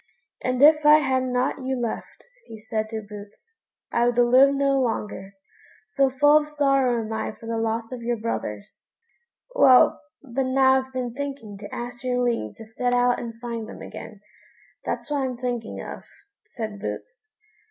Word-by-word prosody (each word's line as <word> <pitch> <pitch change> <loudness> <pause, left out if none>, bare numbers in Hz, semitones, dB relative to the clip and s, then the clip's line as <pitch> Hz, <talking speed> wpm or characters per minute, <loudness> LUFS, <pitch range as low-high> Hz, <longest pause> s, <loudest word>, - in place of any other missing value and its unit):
"And 255 +1 +1
if 305 0 +7
I 300 +1 +8
had 265 -3 +1
not 255 +1 -1
you 260 0 -2
left," 235 -2 -5 0.2
he 220 -1 -10
said 220 0 -3
to 220 -1 -5
Boots, 210 - -12 0.4
"I 235 0 +2
would 245 0 0
live 250 +3 +6
no 275 -1 +2
longer, 210 -5 -3 0.5
so 270 +5 +1
full 290 +3 +5
of 300 0 -7
sorrow 275 -5 +2
am 220 - -5
I 220 - -3
for 225 - -14
the 230 0 -2
loss 225 +1 -2
of 250 -2 -6
your 235 0 -1
brothers." 105 - -5 0.6
"Well, 255 -2 +6 0.2
but 265 0 -2
now 265 0 +4
I've 260 0 -14
been 250 -2 -3
thinking 270 -6 -6
to 205 - -9
ask 245 +1 -6
your 250 -1 0
leave 230 - -1
to 225 - -11
set 245 +3 -1
out 245 0 +3
and 230 -1 -7
find 230 -2 -5
them - - -9
again; 205 - -10 0.6
that's - - -4
what 290 -1 +1
I'm 255 -2 -2
thinking 240 -2 -4
of," - - -7 0.5
said 215 -4 -6
Boots. 450 - -7
245 Hz, 175 wpm, -24 LUFS, 225-265 Hz, 0.6 s, I